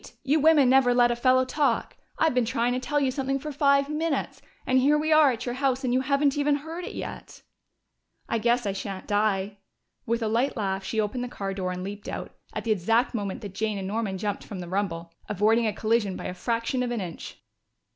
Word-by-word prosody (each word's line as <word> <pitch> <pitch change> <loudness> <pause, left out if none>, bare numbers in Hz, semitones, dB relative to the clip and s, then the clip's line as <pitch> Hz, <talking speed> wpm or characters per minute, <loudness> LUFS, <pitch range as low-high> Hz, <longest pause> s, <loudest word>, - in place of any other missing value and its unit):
You 295 +3 +2
women 300 -3 +5
never 255 -1 +4
let 240 -1 +5
a - - 0
fellow 255 +1 +3
talk. 270 -3 0 0.2
I've 320 -3 +2
been 250 -1 +2
trying 235 +1 0
to 250 - -1
tell 290 +3 0
you 270 -2 +1
something 270 0 -1
for 300 +3 -6
five 280 -1 +3
minutes, 305 0 -2 0.2
and 260 0 +3
here 290 +3 +4
we 310 +1 0
are 305 -3 +6
at 245 0 -5
your 245 - -2
house, 265 0 0
and 250 -1 0
you 255 - +3
haven't 280 +1 +2
heard 295 +4 -1
it - - -7
yet." - - -8 0.8
"I 230 - 0
guess 240 +1 +2
I 200 - 0
shan't 195 -1 -6
die." 205 -1 0 0.5
With 230 +1 0
a - - 0
light 240 +5 0
laugh 195 -2 -2
she 220 - -2
opened 215 +4 -1
the - - -3
car 195 -5 -4
door 185 -1 -3
and 180 0 -5
leaped 205 +2 -7
out, - - -5 0.2
at - - -5
the 230 - -1
exact 225 +7 +2
moment 200 -4 -3
that 200 -3 -7
Jane 215 +1 -2
and 190 -1 -4
Norman 205 -2 -2
jumped 205 +1 -3
from 205 - -8
the 175 - -6
rumble, 170 -3 -3 0.2
avoiding 220 +3 +2
a - - +1
collision 215 -2 0
by - - -7
a - - -3
fraction 230 +6 -1
of 250 - -1
an 240 -1 -2
inch. 175 -4 -7
235 Hz, 225 wpm, -26 LUFS, 205-270 Hz, 0.8 s, are